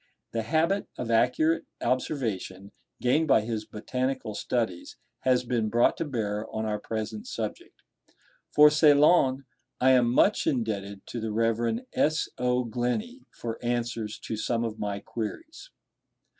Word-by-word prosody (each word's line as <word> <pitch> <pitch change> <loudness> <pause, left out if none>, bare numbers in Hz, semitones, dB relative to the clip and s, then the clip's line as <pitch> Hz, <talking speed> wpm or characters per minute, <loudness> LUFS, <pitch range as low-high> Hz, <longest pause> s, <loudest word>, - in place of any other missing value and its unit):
The 115 - -1
habit 160 - +1
of 115 -2 -3
accurate 125 +8 +2
observation, 110 -8 -2 0.3
gained 150 +6 +2
by 135 - +5
his 110 -1 -4
botanical 130 +1 -3
studies, 110 -5 -2 0.2
has 125 -1 +2
been 115 -3 0
brought 120 +2 +3
to 165 - -2
bear 110 -6 -2
on 110 0 -3
our 105 -1 -1
present 110 -1 -5
subject. - - -6 0.7
For 150 0 +7
Ceylon 145 -2 +5 0.3
I 130 +1 +5
am 125 -2 +4
much 200 +11 +3
indebted 100 -6 -2
to 120 - -5
the 110 -1 -3
Rev. 115 - 0
S. 155 +1 +1
O. 125 0 +1
Glenie 125 - -3
for 115 0 -7
answers 120 -2 -2
to 110 - -4
some 115 +1 -1
of 110 -1 -4
my 100 -1 -2
queries. 315 - -6
120 Hz, 140 wpm, -27 LUFS, 110-135 Hz, 0.7 s, For